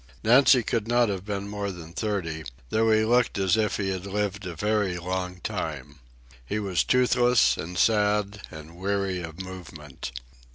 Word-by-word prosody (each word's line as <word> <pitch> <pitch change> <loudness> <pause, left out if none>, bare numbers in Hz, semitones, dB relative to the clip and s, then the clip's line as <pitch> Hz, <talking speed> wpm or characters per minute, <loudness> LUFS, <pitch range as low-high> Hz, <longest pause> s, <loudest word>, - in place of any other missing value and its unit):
Nancy 125 +2 +6
could 115 0 -1
not 120 -1 +3
have 95 -1 -4
been 100 -1 -3
more 100 0 -3
than 85 -3 -9
thirty, 90 -7 -2 0.3
though 110 +1 +2
he 110 0 +4
looked 120 0 +2
as 95 -2 +3
if 105 -3 0
he 100 -2 -1
had 95 0 -4
lived 100 -1 -2
a 85 - -6
very 105 0 0
long 90 +1 -3
time. 70 0 -5 0.4
He 85 - -3
was 100 -4 0
toothless 125 - +4
and 90 +3 -6
sad 105 -1 +2
and 80 +2 -11
weary 95 -1 -1
of 80 0 -8
movement. 75 -9 -9
100 Hz, 165 wpm, -26 LUFS, 90-110 Hz, 0.4 s, Nancy